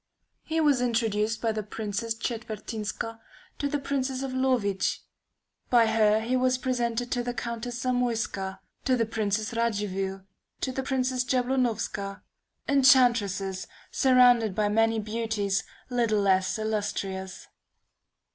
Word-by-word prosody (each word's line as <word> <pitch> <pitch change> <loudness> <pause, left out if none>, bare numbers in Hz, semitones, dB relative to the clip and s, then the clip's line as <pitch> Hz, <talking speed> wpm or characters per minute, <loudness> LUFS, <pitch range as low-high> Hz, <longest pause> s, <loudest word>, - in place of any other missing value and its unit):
He 320 0 -2
was 290 -5 +3
introduced 225 -2 0
by 225 - +2
the 215 0 -2
Princess 215 +2 -3
Czetwertynska 225 -1 -4 0.4
to 285 - 0
the 290 - 0
Princess 270 -1 -2
of 265 -1 -4
Lowicz; 250 -7 +1 0.7
by 240 -2 +5
her 220 -1 +3
he 240 +3 0
was 255 0 +2
presented 245 -2 -1
to 245 - +1
the 245 0 -4
Countess 235 +1 -4
Zamoyska; 230 -6 -1 0.3
to 260 - +3
the 230 - +2
Princess 220 0 -1
Radziwill; 200 -4 -1 0.4
to 260 - -1
the 265 - -2
Princess 260 -1 0
Jablonowska; 245 -6 -1 0.4
enchantresses, 235 -8 +3 0.2
surrounded 245 -5 +5
by 210 0 +1
many 225 +1 +3
beauties 215 -2 -1 0.3
little 230 -4 +2
less 190 0 +2
illustrious. 200 -3 -3
225 Hz, 120 wpm, -27 LUFS, 210-250 Hz, 0.7 s, by